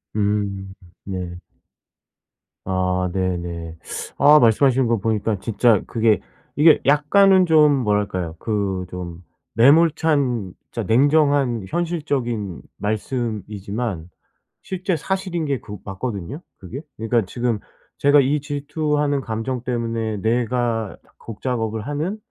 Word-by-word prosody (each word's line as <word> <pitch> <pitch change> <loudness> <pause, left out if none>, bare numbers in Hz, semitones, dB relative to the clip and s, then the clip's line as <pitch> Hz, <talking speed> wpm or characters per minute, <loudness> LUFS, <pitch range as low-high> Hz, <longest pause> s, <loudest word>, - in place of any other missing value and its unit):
음. 100 -2 -1 0.3
네. 90 -3 -5 1.3
아 90 -1 0
네네. 85 -3 -3 0.4
아 150 +2 +7
말씀하시는 125 +2 +4
거 115 - +2
보니까 110 -1 -1
진짜 115 0 +2
그게 110 -4 +2 0.4
이게 155 +2 +6
약간은 185 +7 +5
좀 155 -3 +5
뭐랄까요? 100 -6 -1
그 100 -4 -2
좀 90 -1 -7 0.3
매몰찬 140 - +3 0.2
진짜 - - -3
냉정한 140 -2 +3
현실적인 140 - -2 0.2
말씀이지만 105 -4 -3 0.5
실제 185 0 -2
사실인 185 0 -2
게 140 -3 -1
그 105 -1 -8
맞거든요, 105 - -5 0.2
그게. 115 +10 -8 0.2
그니까 115 +1 +1
지금 120 +2 -2 0.4
제가 145 +1 +5
이 140 +2 +1
질투하는 145 0 -1
감정 115 +2 -3
때문에 115 -3 -2
내가 115 0 -1 0.2
곡 115 -3 -10
작업을 115 -4 -2
하는 155 +8 -2
115 Hz, 230 characters per minute, -21 LUFS, 100-145 Hz, 1.3 s, 아